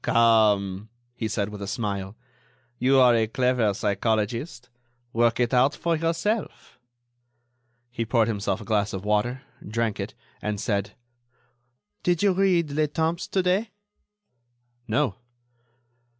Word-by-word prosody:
"Come," 105 -3 +3 0.2
he 120 -2 -3
said, 105 -1 -2
with 105 -1 -8
a 100 - -4
smile, 100 -1 -3 0.6
"you 135 +2 +4
are 125 -2 +6
a 110 -1 +2
clever 125 -2 +1
psychologist. 110 - -1 0.5
Work 115 0 +2
it 120 +1 +1
out 130 +3 +4
for 170 -1 0
yourself." 165 +7 -2 1.1
He 115 -1 -2
poured 115 -1 +2
himself 105 0 -2
a - - -9
glass 105 -1 0
of 95 +1 -5
water, 120 +5 0 0.2
drank 110 0 -2
it, - - -5 0.3
and 105 -1 -2
said: 100 -2 -2 1.1
"Did 175 +1 +1
you 200 -2 +4
read 180 -5 +2
'Le 155 +1 +1
Temps' 160 +3 -1
to 190 - 0
day?" 190 +5 +1 1.2
"No." 115 -1 0
115 Hz, 130 wpm, -25 LUFS, 105-150 Hz, 1.2 s, are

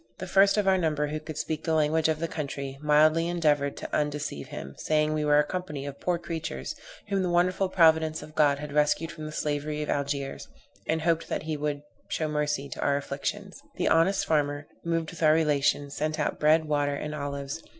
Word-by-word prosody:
The - - -5
first 195 +3 +4
of 205 -2 +1
our 190 -1 +4
number, 150 -3 0
who 155 +1 -3
could 155 0 -8
speak 155 0 -3
the 160 - +1
language 155 +1 +2
of 160 - +1
the 165 - -1
country, 140 -3 -5
mildly 155 +2 +4
endeavored 150 -5 +1
to - - -4
undeceive 150 - -2
him, 70 0 -7
saying, 155 0 +1
we 155 0 0
were 150 0 +4
a 150 - +5
company 150 -7 -5
of 140 -1 -7
poor 180 -1 0
creatures, 160 - -5 0.4
whom 195 -1 +1
the 180 - 0
wonderful 185 +2 +2
providence 160 -3 +3
of 155 - -12
God 145 -2 +3
had 150 0 -7
rescued 150 +2 +2
from 155 -2 -7
the - - -6
slavery 150 0 -2
of - - -2
Algiers, 140 -1 -3 0.4
and 160 0 0
hoped 165 -1 +1
that - - -2
he 155 -1 -2
would 145 -1 -3 0.2
show 155 - -1
mercy 150 -2 -1
to - - -6
our 140 0 +2
afflictions. 140 0 -5
The - - +1
honest 190 +4 +3
farmer, 145 -2 0 0.2
moved 165 -1 -1
with 175 - -11
our 155 -1 +6
relation, 145 -2 +1
sent 155 +2 -2
out - - -1
bread, 155 +1 +4
water 145 -1 0
and 150 +2 -4
olives. 140 0 -4
150 Hz, 210 wpm, -27 LUFS, 145-160 Hz, 0.4 s, our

